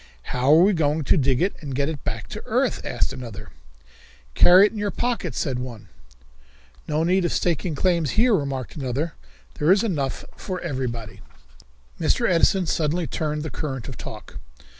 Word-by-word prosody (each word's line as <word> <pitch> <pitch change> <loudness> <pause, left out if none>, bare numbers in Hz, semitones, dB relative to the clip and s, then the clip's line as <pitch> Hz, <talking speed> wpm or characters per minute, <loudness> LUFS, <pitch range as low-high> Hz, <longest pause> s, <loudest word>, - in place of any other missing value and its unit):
"How 130 +3 +2
are 165 - +7
we 205 +2 +4
going 155 -2 +1
to - - +3
dig 135 -2 +2
it 195 - +1
and 140 -4 -5
get 140 +1 +1
it 155 -3 -5
back 110 -5 -4
to - - -6
earth?" - - +1
asked - - -1
another. 115 -6 -8 0.8
"Carry 185 - +7
it - - 0
in 220 - -6
your 205 0 0
pockets," 240 +3 -2
said 130 -5 -1
one. 120 -4 -8 1.0
"No 155 +1 0
need 185 +2 +2
of 175 - 0
staking 170 -1 0
claims 170 -2 +1
here," 235 +1 +5
remarked 135 - -2
another. 140 +3 -2 0.5
"There 150 +4 +4
is 195 +3 +4
enough 145 - -2
for 185 -1 -5
everybody." 125 -8 -4 0.8
Mr. - - +2
Edison 180 +2 +3
suddenly 160 +2 0
turned 150 -1 -2
the 155 - -5
current 135 -6 -4
of - - -7
talk. - - -9
155 Hz, 175 wpm, -23 LUFS, 135-180 Hz, 1.0 s, are